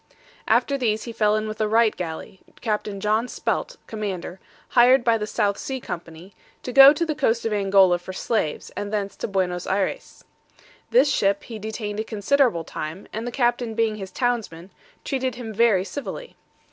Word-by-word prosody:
After 280 Hz, -1 st, +2 dB
these 220 Hz, -3 st, 0 dB
he 235 Hz, -, -6 dB
fell 215 Hz, -2 st, +2 dB
in 215 Hz, 0 st, -1 dB
with 215 Hz, 0 st, -6 dB
the 215 Hz, -, +1 dB
Wright 225 Hz, 0 st, +3 dB
galley, 175 Hz, +2 st, -6 dB, 0.2 s
Capt. 210 Hz, -2 st, -2 dB
John 215 Hz, +4 st, 0 dB
Spelt, -, -, -3 dB
commander, 195 Hz, -4 st, -5 dB, 0.3 s
hired 250 Hz, +1 st, +5 dB
by 230 Hz, -2 st, +3 dB
the 210 Hz, -, -3 dB
South 200 Hz, -1 st, 0 dB
Sea 265 Hz, -1 st, -4 dB
company, 170 Hz, -2 st, -8 dB, 0.3 s
to 250 Hz, -, -5 dB
go 275 Hz, +1 st, +10 dB
to 305 Hz, +3 st, -1 dB
the 315 Hz, -, -1 dB
coast 235 Hz, -6 st, 0 dB
of 225 Hz, -, 0 dB
Angola 195 Hz, -3 st, +4 dB
for 180 Hz, -, -8 dB
slaves, 190 Hz, -4 st, -2 dB
and 205 Hz, 0 st, -5 dB
thence 200 Hz, -2 st, -2 dB
to -, -, -3 dB
Buenos 180 Hz, -3 st, -1 dB
Ayres. 190 Hz, 0 st, -2 dB, 0.7 s
This 465 Hz, -12 st, +4 dB
ship 200 Hz, 0 st, +1 dB
he 225 Hz, -2 st, -8 dB
detained 215 Hz, -1 st, -5 dB
a -, -, 0 dB
considerable 225 Hz, -3 st, +1 dB
time, 155 Hz, +4 st, -7 dB
and 225 Hz, +2 st, -4 dB
the -, -, -3 dB
captain 240 Hz, -2 st, 0 dB
being 225 Hz, -1 st, +1 dB
his 195 Hz, -2 st, -7 dB
townsman, 200 Hz, -6 st, -2 dB, 0.3 s
treated 260 Hz, -3 st, -2 dB
him 235 Hz, -3 st, -7 dB
very 215 Hz, -4 st, +3 dB
civilly. 285 Hz, -, -7 dB
215 Hz, 180 wpm, -23 LUFS, 195-240 Hz, 0.7 s, go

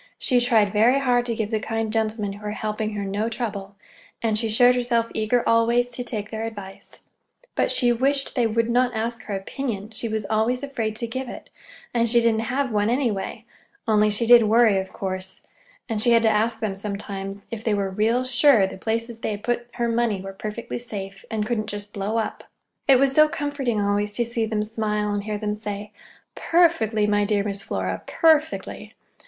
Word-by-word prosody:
She 250 Hz, -2 st, +2 dB
tried 220 Hz, -5 st, +3 dB
very 230 Hz, +5 st, +4 dB
hard 245 Hz, -3 st, +1 dB
to 230 Hz, -, -1 dB
give 220 Hz, 0 st, -3 dB
the 220 Hz, -, +1 dB
kind 225 Hz, 0 st, -3 dB
gentlemen 215 Hz, -2 st, -1 dB
who 205 Hz, +1 st, -12 dB
were 210 Hz, 0 st, -3 dB
helping 215 Hz, 0 st, -3 dB
her 200 Hz, -1 st, -3 dB
no 205 Hz, +3 st, -1 dB
trouble, 205 Hz, -4 st, -5 dB, 0.4 s
and 225 Hz, -2 st, 0 dB
she 225 Hz, +1 st, -1 dB
showed 245 Hz, +3 st, +5 dB
herself 240 Hz, -2 st, 0 dB
eager 220 Hz, +2 st, 0 dB
always 235 Hz, +2 st, +3 dB
to 245 Hz, +1 st, -4 dB
take 215 Hz, -4 st, -5 dB
their 220 Hz, 0 st, -4 dB
advice. 200 Hz, -4 st, -9 dB, 0.5 s
But -, -, +1 dB
she 245 Hz, -2 st, +4 dB
wished 275 Hz, +3 st, 0 dB
they 240 Hz, -3 st, +2 dB
would 230 Hz, +1 st, 0 dB
not 245 Hz, +1 st, +1 dB
ask 230 Hz, +2 st, -2 dB
her 205 Hz, -, -3 dB
opinion; 210 Hz, +1 st, -4 dB
she 225 Hz, +1 st, -4 dB
was 215 Hz, -1 st, -2 dB
always 225 Hz, +5 st, 0 dB
afraid 230 Hz, -6 st, -3 dB
to 235 Hz, -, -3 dB
give 260 Hz, +2 st, -5 dB
it, -, -, -10 dB, 0.4 s
and 235 Hz, -1 st, +2 dB
she 240 Hz, +1 st, +5 dB
didn't 225 Hz, -1 st, +1 dB
have 265 Hz, 0 st, 0 dB
one, 210 Hz, 0 st, +1 dB
anyway; 235 Hz, -6 st, -1 dB, 0.4 s
only 210 Hz, -1 st, +4 dB
she 210 Hz, +3 st, 0 dB
did 240 Hz, 0 st, +8 dB
worry, 220 Hz, -2 st, +4 dB
of 190 Hz, -, -6 dB
course, 185 Hz, -1 st, -6 dB, 0.4 s
and 225 Hz, -3 st, -2 dB
she 240 Hz, +1 st, +4 dB
had 230 Hz, 0 st, +4 dB
to 220 Hz, -, +5 dB
ask 220 Hz, +2 st, 0 dB
them 210 Hz, -3 st, -2 dB
sometimes 200 Hz, 0 st, -6 dB
if 225 Hz, -1 st, -5 dB
they 220 Hz, -2 st, +1 dB
were 200 Hz, -1 st, 0 dB
real 225 Hz, +6 st, +1 dB
sure 255 Hz, -4 st, +4 dB
the 190 Hz, -, -7 dB
places 230 Hz, +2 st, -2 dB
they -, -, -3 dB
had 210 Hz, -1 st, -5 dB
put 240 Hz, 0 st, -1 dB
her 235 Hz, -, -1 dB
money 230 Hz, -3 st, 0 dB
were 195 Hz, +1 st, -7 dB
perfectly 215 Hz, +5 st, -5 dB
safe, 195 Hz, -5 st, -7 dB
and 220 Hz, -2 st, -1 dB
just -, -, -5 dB
couldn't 205 Hz, -3 st, -3 dB
blow 205 Hz, +3 st, -2 dB
up. 225 Hz, -, -3 dB, 0.4 s
It 270 Hz, -2 st, +7 dB
was 275 Hz, +1 st, +3 dB
so 305 Hz, +1 st, +6 dB
comforting 285 Hz, -7 st, -2 dB
always 205 Hz, 0 st, 0 dB
to 235 Hz, +2 st, +1 dB
see 230 Hz, -1 st, -2 dB
them 215 Hz, -1 st, -1 dB
smile, 210 Hz, -1 st, -1 dB
and 205 Hz, 0 st, -3 dB
hear 210 Hz, -1 st, -2 dB
them 210 Hz, 0 st, -2 dB
say: 210 Hz, -1 st, -6 dB, 0.4 s
"Perfectly, 320 Hz, -, +2 dB
my 205 Hz, 0 st, +2 dB
dear 205 Hz, -1 st, +1 dB
Miss 200 Hz, -1 st, -3 dB
Flora, 95 Hz, -, -3 dB
perfectly! 315 Hz, -1 st, +1 dB
220 Hz, 205 wpm, -23 LUFS, 210-240 Hz, 0.5 s, did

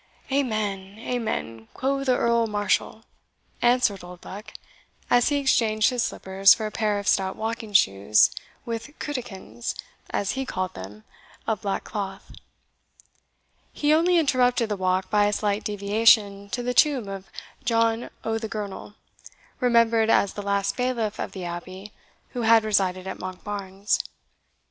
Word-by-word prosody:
"Amen, 210 Hz, -7 st, -1 dB
amen, 220 Hz, -, -4 dB
quo' 275 Hz, +1 st, -1 dB
the 255 Hz, -2 st, +2 dB
Earl 235 Hz, -1 st, +2 dB
Marshall," 210 Hz, +1 st, -1 dB, 0.6 s
answered 240 Hz, -5 st, +2 dB
Oldbuck, 180 Hz, +4 st, -10 dB, 0.6 s
as 245 Hz, +2 st, +5 dB
he 290 Hz, -, +1 dB
exchanged 225 Hz, -6 st, +2 dB
his 250 Hz, -1 st, -1 dB
slippers 195 Hz, -1 st, +4 dB
for 220 Hz, -, -4 dB
a 215 Hz, -, -3 dB
pair 210 Hz, -1 st, 0 dB
of 200 Hz, 0 st, -5 dB
stout 190 Hz, -1 st, +2 dB
walking 225 Hz, 0 st, -4 dB
shoes, 100 Hz, -, +4 dB, 0.3 s
with 230 Hz, +5 st, -6 dB
cutikins, 195 Hz, -, -5 dB, 0.3 s
as 200 Hz, -, -1 dB
he 270 Hz, -, -2 dB
called 185 Hz, -8 st, -3 dB
them, 100 Hz, +3 st, -10 dB, 0.4 s
of 220 Hz, -4 st, -1 dB
black 200 Hz, -1 st, -2 dB
cloth. 195 Hz, -2 st, -6 dB, 1.4 s
He 295 Hz, +1 st, +2 dB
only 345 Hz, +3 st, +4 dB
interrupted 250 Hz, -6 st, +2 dB
the 210 Hz, -, 0 dB
walk 185 Hz, 0 st, 0 dB
by 210 Hz, -1 st, +4 dB
a 205 Hz, -, 0 dB
slight 205 Hz, 0 st, 0 dB
deviation 205 Hz, -1 st, +3 dB
to 245 Hz, +1 st, -3 dB
the 250 Hz, +1 st, -1 dB
tomb 270 Hz, -6 st, +3 dB
of 195 Hz, -1 st, -7 dB, 0.4 s
John 230 Hz, 0 st, +1 dB
o' 225 Hz, 0 st, -1 dB
the 220 Hz, -1 st, -5 dB
Girnel, 205 Hz, -1 st, -6 dB, 0.6 s
remembered 230 Hz, -2 st, +3 dB
as 200 Hz, -3 st, +3 dB
the 205 Hz, -, -5 dB
last 200 Hz, 0 st, 0 dB
bailiff 240 Hz, -4 st, -1 dB
of -, -, -3 dB
the 185 Hz, -2 st, -6 dB
abbey 185 Hz, +4 st, -7 dB, 0.4 s
who 245 Hz, -, -4 dB
had 225 Hz, -1 st, +5 dB
resided 190 Hz, -3 st, +1 dB
at 190 Hz, -, -6 dB
Monkbarns. 195 Hz, +2 st, -3 dB
210 Hz, 145 wpm, -25 LUFS, 195-235 Hz, 1.4 s, as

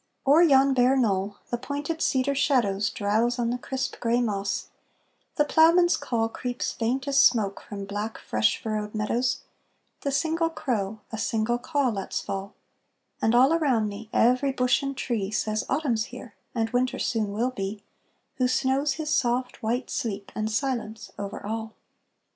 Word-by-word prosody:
O'er 290 Hz, +5 st, +6 dB
yon 275 Hz, -4 st, +5 dB
bare 255 Hz, +1 st, +4 dB
knoll 200 Hz, -4 st, 0 dB
the 240 Hz, -, -1 dB
pointed 290 Hz, +5 st, -4 dB
cedar 265 Hz, +1 st, +2 dB
shadows 225 Hz, -8 st, +2 dB
Drowse 220 Hz, +4 st, 0 dB
on 235 Hz, -1 st, 0 dB
the 250 Hz, -, -2 dB
crisp, 265 Hz, +1 st, -4 dB
gray 235 Hz, 0 st, +1 dB
moss; 200 Hz, -4 st, -2 dB, 0.7 s
the 295 Hz, -, +3 dB
ploughman's 335 Hz, +3 st, +5 dB
call 235 Hz, -5 st, -1 dB
Creeps 245 Hz, +2 st, -3 dB
faint 255 Hz, +4 st, -2 dB
as 280 Hz, 0 st, +3 dB
smoke 215 Hz, -7 st, +3 dB
from 200 Hz, -1 st, -7 dB
black, 205 Hz, +2 st, -4 dB
fresh 110 Hz, 0 st, +1 dB
furrowed 215 Hz, -1 st, -3 dB
meadows; 230 Hz, +4 st, 0 dB, 0.6 s
The 280 Hz, -, -2 dB
single 325 Hz, +3 st, +1 dB
crow 220 Hz, -10 st, -3 dB
a 220 Hz, -, -4 dB
single 225 Hz, +2 st, 0 dB
caw 280 Hz, 0 st, 0 dB
lets 195 Hz, -4 st, -3 dB
fall; 195 Hz, +1 st, -5 dB, 0.7 s
And 225 Hz, +2 st, +3 dB
all 260 Hz, +5 st, +6 dB
around 260 Hz, -10 st, +2 dB
me 205 Hz, +2 st, -9 dB
every 255 Hz, +4 st, +3 dB
bush 250 Hz, +1 st, +2 dB
and 275 Hz, -1 st, -4 dB
tree 220 Hz, -8 st, -2 dB
Says 215 Hz, 0 st, -1 dB
Autumn 275 Hz, -5 st, +1 dB
's 220 Hz, -, -1 dB
here, 245 Hz, -2 st, -10 dB, 0.2 s
and 225 Hz, -1 st, 0 dB
Winter 250 Hz, +1 st, +1 dB
soon 215 Hz, -3 st, -1 dB
will 235 Hz, +5 st, 0 dB
be 205 Hz, -3 st, -5 dB, 0.5 s
Who 255 Hz, -1 st, +2 dB
snows 270 Hz, +3 st, +1 dB
his 310 Hz, -1 st, -4 dB
soft, 250 Hz, 0 st, 0 dB
white 240 Hz, +4 st, -2 dB
sleep 200 Hz, -3 st, -3 dB
and 215 Hz, 0 st, -2 dB
silence 230 Hz, -2 st, -3 dB
over 200 Hz, 0 st, -5 dB
all. 220 Hz, +1 st, -4 dB
240 Hz, 165 wpm, -26 LUFS, 215-270 Hz, 0.7 s, O'er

